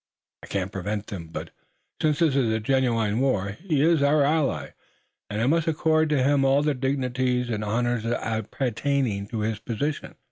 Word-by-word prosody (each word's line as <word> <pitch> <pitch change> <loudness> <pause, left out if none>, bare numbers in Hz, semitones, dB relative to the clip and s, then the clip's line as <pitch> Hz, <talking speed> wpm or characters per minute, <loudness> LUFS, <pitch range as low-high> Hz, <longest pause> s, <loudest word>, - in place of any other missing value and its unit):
I - - -11
couldn't 95 -1 -2
prevent 100 +2 -3
them, 90 -6 -7
but, 80 - -7 0.5
since 150 -2 +2
there 165 0 +4
is 115 -6 +1
genuine 115 -4 +1
war, 105 -8 +1
he 150 - -1
is 165 -2 +4
our 145 +1 +4
ally, 150 0 0 0.6
and 105 - -3
I 115 - +1
must 165 +4 +2
accord 160 0 +2
to 145 -4 +2
him 140 0 +3
all 135 +2 +3
the 150 0 +2
dignities 125 -2 -1
and 105 -1 -2
honors 120 +2 0
appertaining 115 0 -1
to 110 0 -4
his 110 0 -1
position." 140 +7 -3
125 Hz, 170 wpm, -25 LUFS, 110-145 Hz, 0.6 s, there